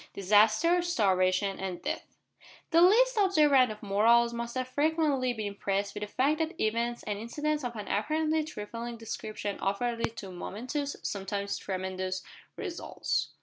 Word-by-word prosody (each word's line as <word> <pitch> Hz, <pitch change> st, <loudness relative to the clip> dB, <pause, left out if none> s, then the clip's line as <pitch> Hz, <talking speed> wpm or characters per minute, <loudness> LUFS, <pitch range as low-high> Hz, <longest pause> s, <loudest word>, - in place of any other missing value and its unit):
DISASTER, 215 Hz, -, +4 dB
STARVATION, 195 Hz, -, +1 dB
AND 190 Hz, -2 st, -5 dB
DEATH. -, -, -5 dB, 0.5 s
The 335 Hz, 0 st, +6 dB
least 470 Hz, +7 st, +5 dB
observant 300 Hz, -, +5 dB
of 215 Hz, 0 st, -10 dB
mortals 230 Hz, +4 st, +4 dB
must 235 Hz, +1 st, -4 dB
have 255 Hz, 0 st, -1 dB
frequently 290 Hz, -2 st, +1 dB
been 220 Hz, -3 st, -4 dB
impressed 200 Hz, 0 st, -2 dB
with -, -, -6 dB
the 210 Hz, -, -3 dB
fact 280 Hz, +8 st, +1 dB
that 325 Hz, +1 st, -2 dB
events 235 Hz, +2 st, 0 dB
and 205 Hz, -1 st, -3 dB
incidents 295 Hz, +6 st, -2 dB
of 240 Hz, -1 st, -4 dB
an 210 Hz, -2 st, -6 dB
apparently 310 Hz, +8 st, +1 dB
trifling 235 Hz, -3 st, -6 dB
description 215 Hz, -2 st, -5 dB
often 230 Hz, +5 st, -1 dB
lead 230 Hz, 0 st, -2 dB
to 195 Hz, -2 st, -7 dB
momentous 255 Hz, +10 st, -4 dB
sometimes 200 Hz, 0 st, -3 dB
tremendous 185 Hz, -1 st, -3 dB, 0.3 s
results. 360 Hz, -5 st, -3 dB
235 Hz, 150 wpm, -29 LUFS, 200-300 Hz, 0.5 s, The